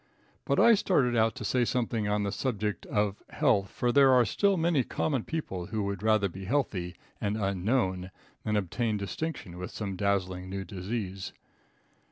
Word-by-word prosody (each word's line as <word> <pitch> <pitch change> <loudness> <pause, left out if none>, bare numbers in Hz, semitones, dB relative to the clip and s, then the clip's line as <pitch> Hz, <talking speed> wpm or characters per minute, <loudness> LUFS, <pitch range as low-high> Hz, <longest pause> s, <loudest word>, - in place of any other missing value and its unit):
But - - +1
I 235 - +7
started 140 - +2
out 110 0 +3
to - - -6
say 125 -1 +2
something 115 -3 0
on 105 0 +1
the 100 - -1
subject 105 -5 -2
of 105 -1 0
health, 95 -1 +2
for 120 - 0
there 135 0 +6
are 125 -1 +5
still 200 - +2
many 165 -5 +2
common 135 -2 -1
people 95 - -4
who 110 -2 -2
would 100 0 -3
rather 110 -2 +3
be 95 +1 -8
healthy 95 -8 -1 0.3
and 105 0 0
unknown 95 -1 0 0.3
than 105 - 0
obtain 105 +3 -1
distinction 100 - -5
with 90 - -5
some 100 -3 -4
dazzling 95 -2 -1
new 95 0 -4
disease. 95 0 -4
105 Hz, 170 wpm, -29 LUFS, 95-125 Hz, 0.3 s, I